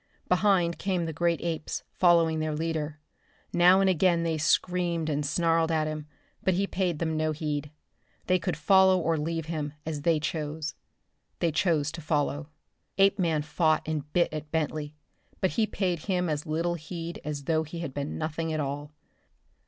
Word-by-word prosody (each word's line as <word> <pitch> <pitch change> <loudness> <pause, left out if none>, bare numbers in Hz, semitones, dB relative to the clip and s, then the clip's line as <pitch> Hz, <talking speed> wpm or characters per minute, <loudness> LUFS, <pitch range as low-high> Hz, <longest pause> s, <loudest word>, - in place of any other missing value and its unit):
Behind 180 -2 +2
came 185 -3 0
the 160 - -4
great 170 +1 +1
apes, 165 -2 -3
following 165 -3 +4
their 155 -1 -1
leader. 155 -1 -2 0.5
Now 180 +2 +6
and 195 - +3
again 175 -2 +3
they 165 -2 -1
screamed 170 +1 +1
and 150 0 0
snarled 165 +2 +2
at 155 -1 +2
him, 155 -1 -4 0.3
but 190 - +2
he 195 +2 +1
paid 180 -4 -1
them 160 0 -1
no 155 0 0
heed. 150 -1 -3 0.6
They 185 0 +3
could 165 -2 -2
follow 190 +3 +5
or 165 -2 +1
leave 165 +1 -2
him, 155 -3 -3
as 155 -2 -3
they 165 0 +3
chose. 150 0 -3 0.6
They 170 - +1
chose 155 -2 +1
to 170 - -7
follow. 145 -1 -1 0.5
Apeman 185 -6 +3
fought 155 +1 +1
and 150 -2 -3
bit 175 -1 +2
at 155 0 -5
Bentley, 150 -1 -2 0.4
but 190 - +1
he 225 -2 +1
paid 180 -6 -1
him 180 0 -1
as 150 0 -2
little 165 +3 0
heed 170 +1 -6
as 150 -2 -4
though 160 +2 +1
he 160 +2 -6
had 160 -6 -5
been 145 +1 -4
nothing 160 +1 -2
at 155 - -1
all. 145 +1 -3
160 Hz, 175 wpm, -28 LUFS, 150-175 Hz, 0.6 s, Now